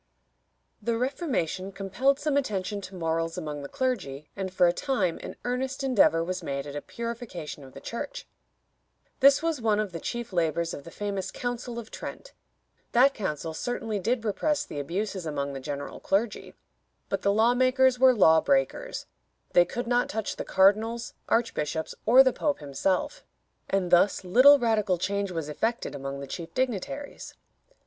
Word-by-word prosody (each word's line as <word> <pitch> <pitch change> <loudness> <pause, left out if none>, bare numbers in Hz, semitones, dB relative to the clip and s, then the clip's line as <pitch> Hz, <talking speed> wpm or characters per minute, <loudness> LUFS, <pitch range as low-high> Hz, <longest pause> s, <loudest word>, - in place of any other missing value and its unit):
The 230 +2 0
Reformation 235 - -2
compelled 200 +9 0
some 300 -2 0
attention 205 -6 -1
to 185 0 -9
morals 165 -1 -1
among 150 -4 -4
the 140 - -7
clergy, 180 - -3
and 190 -1 -4
for 185 -1 +4
a 175 - +4
time 210 - -1
an - - -7
earnest 260 +2 -2
endeavor 205 -10 +4
was 185 +2 -3
made 140 0 -3
at 145 0 -7
a 145 - -3
purification 230 - -6
of 130 -1 -13
the - - -8
Church. - - -6 0.9
This 275 +2 +6
was 325 -6 -1
one 215 -2 +2
of 210 -3 -1
the 165 - -5
chief 240 +3 -5
labors 170 -1 0
of 140 - -8
the - - -8
famous 200 +1 -3
Council 245 -1 -4
of 230 -2 -7
Trent. - - -8 0.6
That 265 +3 +6
council 160 - -3
certainly 225 +2 -3
did 230 +3 -1
repress 295 +8 0
the 145 - -6
abuses 185 +4 -3
among 140 -2 -2
the 135 - -5
general 140 +1 -6
clergy, 205 +3 -1 0.5
but - - -2
the 200 - +2
law 220 +4 +4
makers 255 0 +3
were 260 -1 +6
law 160 -6 +6
breakers. 285 - 0 0.5
They 175 - +6
could 240 +7 -4
not 245 +1 +1
touch 220 -1 -3
the - - -4
cardinals, 215 +5 +2 0.2
archbishops, 160 -9 0
or 255 +4 +9
the 260 -2 +2
Pope 295 -1 0
himself, 180 - -1 0.5
and 190 -3 0
thus 180 +3 +4
little 255 +10 +7
radical 215 -7 +1
change 200 +2 -1
was 165 -4 -4
effected 225 +10 -2
among 140 0 -5
the - - -5
chief 165 +4 -7
dignitaries. 260 +3 -3
205 Hz, 170 wpm, -27 LUFS, 170-245 Hz, 0.9 s, or